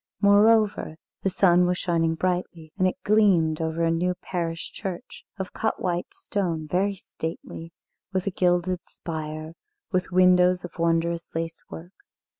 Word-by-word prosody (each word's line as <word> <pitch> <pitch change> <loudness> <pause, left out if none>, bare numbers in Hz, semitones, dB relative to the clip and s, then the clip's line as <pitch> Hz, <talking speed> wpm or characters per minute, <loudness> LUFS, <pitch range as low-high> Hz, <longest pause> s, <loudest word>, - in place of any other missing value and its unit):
Moreover, 205 -4 +4 0.2
the 195 - +1
sun 180 -2 +4
was 180 0 0
shining 165 -3 +1
brightly, 175 -2 -3
and 185 -2 +2
it 185 - -1
gleamed 185 -7 +3
over 160 +1 -1
a 165 - +3
new 180 +2 0
parish 170 -2 -4
church, 190 -4 -7
of 190 -2 -5
cut 220 - -1
white 175 - -2
stone, 195 - -3
very 195 +5 +1
stately, 165 -2 -7 0.4
with 185 -2 -1
a 200 - 0
gilded 180 0 +1
spire, 155 -1 -6 0.4
with 185 -2 0
windows 180 0 +4
of 175 0 -12
wondrous 170 0 +1
lacework. 165 +2 -6
180 Hz, 140 wpm, -25 LUFS, 165-185 Hz, 0.4 s, Moreover